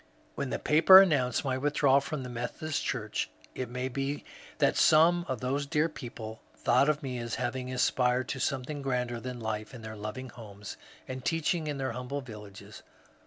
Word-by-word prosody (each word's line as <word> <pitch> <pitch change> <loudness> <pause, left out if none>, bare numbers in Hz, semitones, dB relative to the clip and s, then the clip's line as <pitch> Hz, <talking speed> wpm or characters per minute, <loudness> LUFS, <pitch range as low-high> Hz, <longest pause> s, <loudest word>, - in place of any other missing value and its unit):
When 140 - -3
the - - -1
papers 170 +6 +8
announced 135 -7 +1
my 130 -1 0
withdrawal 140 -1 +3
from 140 -1 -4
the 125 - -6
Methodist 130 +6 -3
Church, 110 -5 -2 0.2
it 130 - -4
may 125 +1 -3
be 135 +2 -3 0.3
that - - +3
some 170 +3 +5
of 130 -4 -3
those 140 +3 -1
dear 155 +1 +2
people 115 -6 -8
thought 130 +5 +3
of 150 -1 0
me 130 -2 -3
as 120 -1 -3
having 125 +1 -3
aspired 125 0 +1
to 130 - -3
something 140 +2 -2
grander 125 -3 -1
than 125 +1 -6
life 110 +1 -4
in 115 - -10
their 110 0 -7
loving 110 +5 -6
homes 105 -3 -9 0.3
and 130 -1 -6
teaching 165 +1 0
in 145 -2 -2
their 135 -2 -2
humble 125 +4 -4
vil 110 -5 -9
lages. 100 -2 -12
130 Hz, 185 wpm, -29 LUFS, 120-145 Hz, 0.3 s, papers